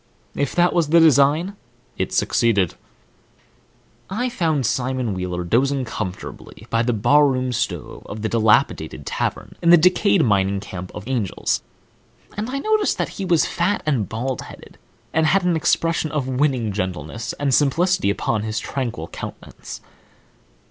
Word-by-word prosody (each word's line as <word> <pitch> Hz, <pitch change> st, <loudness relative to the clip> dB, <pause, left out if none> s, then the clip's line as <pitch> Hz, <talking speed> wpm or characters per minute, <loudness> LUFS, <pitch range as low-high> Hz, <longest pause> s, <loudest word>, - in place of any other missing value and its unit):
If 140 Hz, -2 st, -2 dB
that 175 Hz, 0 st, +3 dB
was 170 Hz, -3 st, +2 dB
the 170 Hz, +2 st, +6 dB
design, 155 Hz, +5 st, +4 dB, 0.4 s
it -, -, -2 dB
certainly -, -, 0 dB, 0.2 s
suceeded. 95 Hz, -5 st, +1 dB, 1.4 s
I 240 Hz, +7 st, -1 dB
found 160 Hz, -, 0 dB
Simon 125 Hz, -1 st, -1 dB
Wheeler 90 Hz, -1 st, -3 dB
dozing 130 Hz, +8 st, +1 dB
comfortably 100 Hz, -5 st, -7 dB
by 115 Hz, -, +2 dB
the 120 Hz, +1 st, +1 dB
barroom 130 Hz, +3 st, +3 dB
stove 115 Hz, -9 st, -3 dB
of 105 Hz, +1 st, -7 dB
the -, -, +1 dB
old, -, -, -13 dB
dilapidated 110 Hz, -, +2 dB
tavern -, -, -3 dB
in 170 Hz, -, +2 dB
the 175 Hz, -, +9 dB
ancient 180 Hz, +1 st, +3 dB
mining 100 Hz, -1 st, +2 dB
camp 95 Hz, -2 st, -8 dB
of 105 Hz, +1 st, -8 dB
Angel's, 120 Hz, -7 st, -1 dB, 0.7 s
and 215 Hz, +3 st, -3 dB
I 270 Hz, -, -3 dB
noticed 430 Hz, +7 st, +1 dB
that -, -, -1 dB
he 195 Hz, -, -5 dB
was 170 Hz, -3 st, +3 dB
fat 180 Hz, +4 st, -1 dB
and 130 Hz, -10 st, 0 dB
bald 125 Hz, +3 st, -3 dB
headed, -, -, -13 dB, 0.3 s
and 160 Hz, 0 st, +3 dB
had 190 Hz, +4 st, +3 dB
an 175 Hz, -2 st, +2 dB
expression 160 Hz, 0 st, +1 dB
of 145 Hz, -4 st, -2 dB
winning 130 Hz, -4 st, 0 dB
gentleness 95 Hz, -, -4 dB
and 140 Hz, -2 st, -1 dB
simplicity 165 Hz, -, +2 dB
upon 105 Hz, +2 st, -1 dB
his 110 Hz, 0 st, -2 dB
tranquil 120 Hz, -, -4 dB
countenance. -, -, -9 dB
130 Hz, 155 wpm, -21 LUFS, 110-165 Hz, 1.4 s, the